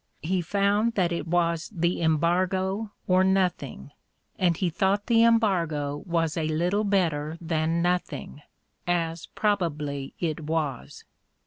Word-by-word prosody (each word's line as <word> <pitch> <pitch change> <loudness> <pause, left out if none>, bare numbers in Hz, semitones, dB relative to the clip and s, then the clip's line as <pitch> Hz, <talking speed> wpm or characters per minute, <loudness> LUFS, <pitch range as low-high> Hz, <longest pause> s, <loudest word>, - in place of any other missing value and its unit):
He 180 +3 0
found 205 +5 +1
that 180 -3 +1
it 170 -1 -3
was 170 -1 0
the 175 -2 0
embargo 185 +6 +1 0.2
or 185 0 +4
nothing, 180 - 0 0.5
and 175 -3 +2
he 180 -3 0
thought 200 +3 +1
the 230 -1 +4
embargo 170 -11 +2
was 165 -3 0
a 160 -2 -1
little 175 +7 +1
better 165 -6 0
than 165 0 0
nothing, 175 -4 -2 0.5
as 165 -1 -1
probably 150 -9 -2
it 160 -3 -2
was. 155 -4 -3
170 Hz, 125 wpm, -26 LUFS, 160-190 Hz, 0.5 s, or